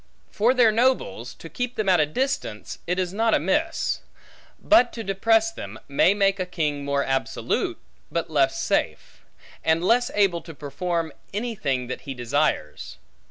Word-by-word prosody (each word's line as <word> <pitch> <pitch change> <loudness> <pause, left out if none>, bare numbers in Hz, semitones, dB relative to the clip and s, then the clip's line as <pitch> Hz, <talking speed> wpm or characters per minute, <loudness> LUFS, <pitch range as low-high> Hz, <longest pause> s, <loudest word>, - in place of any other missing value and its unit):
For 235 +5 +2
their 240 -3 +5
nobles; 260 - 0
to - - -11
keep 245 -1 -4
them 215 - -2
at 180 -3 +5
a 150 - +3
distance, 155 - -3
it 180 +1 0
is 185 -1 -1
not 225 +2 +2
amiss; 300 - 0 0.6
but 280 -6 +5
to 225 - -5
depress 220 +3 +2
them, 110 - -8
may 160 +7 +3
make 195 -1 +2
a 185 - 0
king 150 -5 -2
more 140 0 0
absolute, 135 0 -1 0.3
but 170 0 -1
less 140 -4 +1
safe; - - -2 0.4
and 160 +1 +2
less 240 +4 +3
able 195 -5 +2
to 165 -2 -11
perform, 160 +2 -3 0.2
any 235 +3 -2
thing 135 - -1
that 130 - -6
he 135 - -6
desires. 120 - -1
180 Hz, 160 wpm, -24 LUFS, 145-225 Hz, 0.6 s, their